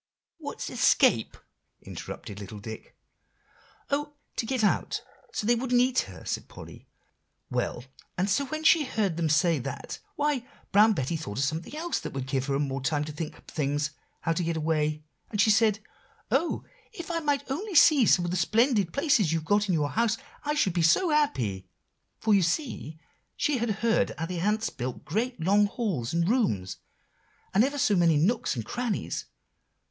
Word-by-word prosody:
"What's - - -6
escape?" - - +3 0.5
interrupted 100 -1 -8
little 105 +1 -8
Dick. 110 +2 -9 0.9
"Oh! 295 +1 -1 0.2
to 225 - -2
get 255 -3 0
out, 205 - +1 0.3
so - - -3
they 240 - +4
wouldn't 245 +1 +1
eat 250 +1 +3
her 90 -3 -11
up!" - - -12
said - - -3
Polly; - - -12 0.6
"well, 120 - -2 0.3
and 185 +2 +1
so 220 +8 +1
when 310 +3 -4
she 315 0 +6
heard 210 - -1
them 165 -1 0
say 155 +1 +3
that, 135 +1 -6 0.2
why, 290 -4 0 0.3
Brown 215 +2 +6
Betty 135 -2 -2
thought 135 -10 -5
of 135 - +1
something 160 - -3
else 340 +1 -1
that - - -7
would 135 -2 -3
give 130 0 -1
her 140 -1 +1
more 135 -1 -2
time 145 +2 0
to 155 - -5
think 150 +1 -6
up - - -16
things, 145 0 -1 0.3
how 165 - +1
to 175 - -1
get 165 0 -1
away. 155 -1 0 0.3
And 210 - -4
she 215 +2 +5
said, 215 0 +4 0.5
'Oh! 285 +7 +1 0.3
if 345 -6 -7
I 335 - 0
might 290 -3 0
only 375 +7 -3
see 290 -6 +7
some 175 - +4
of 175 - -2
the 185 - 0
splendid 215 0 +2
places 260 - +2
you've 165 -1 -1
got 205 +4 +2
in 180 - +3
your 145 -2 0
house, 230 0 +1 0.3
I 295 0 -1
should 190 - +2
be 175 - +1
so 170 - +4
happy;' 125 - 0 0.5
for 220 - +2
you 200 - +5
see 170 - -2 0.4
she 290 -5 +1
had 235 0 -1 0.2
heard 225 - +2
how 160 - -2
the 175 0 -4
ants 210 +4 0
build 125 0 -5
great, 225 - -2
long 200 +5 +4
halls 190 - -2
and 170 0 +1
rooms, 110 - 0 0.8
and 205 - +5
ever 285 +3 -1
so 215 -6 +3
many 170 -4 +4
nooks 195 +3 +1
and 115 -3 -4
crannies. 240 - -3
195 Hz, 185 wpm, -27 LUFS, 150-245 Hz, 0.9 s, see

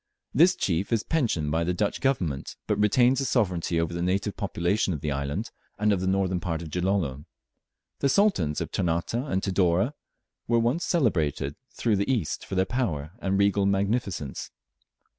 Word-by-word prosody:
This 170 +7 +5
chief 95 +3 -1
is 115 -2 +2
pensioned 110 - 0
by 80 +2 +1
the 90 +1 -1
Dutch 100 +1 -1
Government, 90 - -1
but 105 -1 0
retains 120 +5 +4
the 135 - 0
sovereignty 90 -9 +1
over 85 +1 -1
the 85 - -3
native 95 +3 0
population 95 0 0
of 70 - -7
the 75 - -2
island, 70 +10 -3 0.3
and 105 0 +2
of 95 - -1
the 95 - -1
northern 95 -1 +1
part 85 -2 -3
of 80 - -8
Gilolo. 90 -6 -1 0.7
The 140 - +2
sultans 135 - +2
of - - -4
Ternate 85 0 -1
and 120 -5 -1
Tidore 95 - +2 0.5
were 120 - +3
once 120 +9 +1
celebrated 80 - +1 0.2
through 110 -4 +1
the 100 +6 0
East 110 - -2
for - - -4
their 95 0 +3
power 85 - -2
and 95 -2 0
regal 100 0 +3
magnificence. 100 - -1
95 Hz, 175 wpm, -26 LUFS, 85-115 Hz, 0.7 s, This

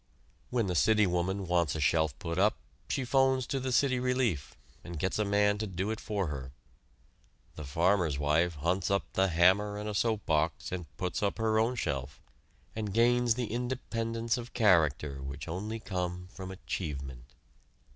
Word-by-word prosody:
When 120 -3 +1
the 90 - -1
city 105 +5 +4
woman 95 +2 -1
wants 85 -4 +1
a - - -2
shelf 80 -1 +2
put 85 -2 -3
up 105 +2 +4 0.3
she 135 - -1
'phones 130 0 +3
to 135 - -2
the 130 0 -2
City 130 0 +3
Relief, 125 - 0 0.3
and 85 -1 -7
gets 95 +7 -1
a - - +3
man 105 0 +2
to 110 - -2
do 95 +3 -2
it 110 - -3
for 100 -3 -2
her; 65 -4 -6 1.0
the 75 - -8
farmer's 85 +2 +1
wife 80 +4 +2
hunts 85 +6 0
up 100 0 +2
the 95 0 +3
hammer 95 +4 +3
and 105 +1 -5
a 105 - -3
soap 110 0 0
box 80 -3 0
and 90 -3 -4
puts 90 -2 -2
up 100 -1 0
her 110 -1 +2
own 115 +3 +1
shelf, 70 - -3 0.6
and 105 -2 -3
gains 120 0 +4
the 120 -3 -3
independence 115 -1 -2
of 120 +1 -9
character 75 - +3
which 70 +2 -6
only 105 +7 -4
come 90 -3 -4
from 95 -1 -7
achievement. 70 -10 -6
95 Hz, 175 wpm, -30 LUFS, 80-110 Hz, 1.0 s, city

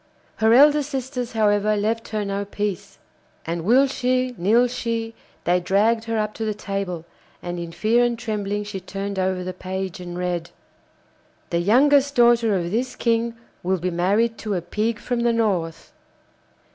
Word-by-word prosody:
Her 220 0 +3
elder 295 +4 +6
sisters 265 -4 -4
however 210 -1 +2
left 225 +2 -1
her 215 -2 -2
no 200 0 -2
peace, 205 -1 -4 0.5
and 170 0 -3
will 250 +8 +5
she, 255 -1 0
nill 220 +7 +3
she, 230 -2 -3 0.3
they 180 +1 +2
dragged 215 +5 +2
her 225 -1 -1
up 215 0 -1
to 225 - -5
the 215 -1 -1
table, 195 -5 -4 0.4
and 175 0 -4
in 170 -1 -6
fear 225 +7 +2
and 240 -1 0
trembling 210 -2 -3
she 205 -2 -6
turned 195 +1 -5
over 185 -1 0
the 185 0 -4
page 185 0 -5
and 175 -1 -7
read: 175 -2 -2 1.0
'The 170 - +1
youngest 280 +8 +4
daughter 235 -3 +4
of 170 -1 -3
this 245 +4 -1
King 230 0 0 0.3
will 185 +1 0
be 180 +1 -2
married 205 +7 +1
to 210 -2 -2
a 180 - -1
pig 215 +6 -1
from 245 +2 -3
the 235 0 +2
North. 190 -8 -1
210 Hz, 170 wpm, -23 LUFS, 185-235 Hz, 1.0 s, elder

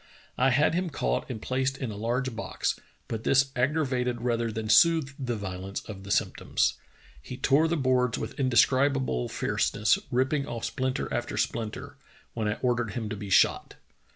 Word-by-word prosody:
I 130 +2 +3
had 145 +5 +3
him 180 +1 0
caught 60 - -2
and 120 -4 -4
placed 130 +3 -1
in 130 -5 -4
a - - -7
large 120 +4 -2
box, - - -2 0.3
but 110 -1 -4
this 135 0 +3
aggra 150 +5 +1
vated 125 -2 -1
rather 120 -1 0
than 110 0 -4
soothed 145 +5 +5
the 120 -2 -1
violence 95 -1 -5
of 95 -3 -9
the - - -9
symptoms. - - +1 0.5
He 125 - -8
tore 145 +5 +3
the 170 +1 0
boards 125 -3 +2
with - - -6
indescribable 130 - +2
fierceness, 105 +1 +1
rip 130 +1 +1
ping 145 -2 0
off 115 -1 -4
splinter 130 -1 -2
after 120 - -3
splinter, 110 -2 -3 0.4
when 110 -2 -2
I 105 - 0
ordered 120 -3 0
him 115 -4 -4
to 105 - -3
be 100 -1 -7
shot." - - +3
125 Hz, 180 wpm, -27 LUFS, 110-135 Hz, 0.5 s, soothed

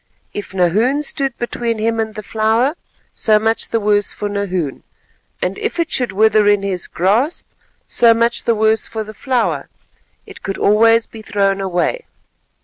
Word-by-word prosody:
If 205 - -6
Nahoon 210 - +1
stood 275 -3 -1
between 235 -1 -2
him 225 +1 -1
and 220 -1 -2
the 215 - -6
flower, 220 +7 +1 0.4
so 215 -2 +3
much 225 +1 0
the 230 - 0
worse 205 -1 +1
for 210 - -4
Nahoon, 185 -8 -3 0.6
and - - -2
if 435 -4 -3
it 335 - 0
should 250 -4 0
wither 215 +1 +3
in 205 -1 +3
his 185 -3 -2
grasp, 220 - 0 0.4
so 235 -1 +4
much 235 +1 +1
the 230 - +2
worse 220 +1 +2
for 220 -1 -4
the 215 0 -10
flower; 255 +1 -1 0.6
it - - -13
could 195 - -4
always 225 +2 +4
be 220 - -12
thrown 195 -2 0
away. 190 - -1
220 Hz, 165 wpm, -17 LUFS, 205-235 Hz, 0.6 s, so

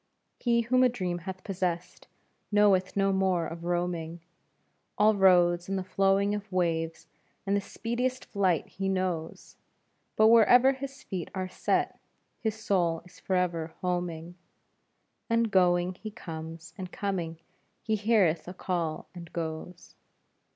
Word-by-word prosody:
He 235 -1 +2
whom 255 +2 +2
a 255 - +6
dream 180 -7 -3
hath 185 0 -7
possessed 180 -3 -3 0.4
knoweth 200 -2 +3
no 195 0 +3
more 190 -3 +1
of 165 0 -7
roaming; 175 -1 -2 0.8
All 215 +1 +5
roads 175 -3 +4
and 195 - 0
the 190 - -2
flowing 195 +2 +2
of 205 -1 -5
waves 165 -3 -1 0.4
and 200 0 +1
the 200 - +1
speediest 245 +5 -3
flight 190 -6 +1
he 195 0 -4
knows, 185 -4 -3 0.6
But 220 0 +6
wherever 240 +3 +7
his 275 +1 -8
feet 180 -3 -5
are 185 -1 -2
set, 185 - -1 0.4
his 220 -2 -1
soul 180 -7 0
is 180 - -17
forever 170 -4 -1
homing, 175 -1 -3 0.9
And 230 -1 +2
going, 180 -1 +3
he 215 +4 -8
comes, 165 -5 -8
and 185 -1 -6
coming 175 -5 -3 0.5
he 220 - +1
heareth 200 -7 +2
a 180 - -7
call 170 -4 -2
and 170 -2 -10
goes. 165 +1 -6
185 Hz, 135 wpm, -29 LUFS, 175-205 Hz, 0.9 s, wherever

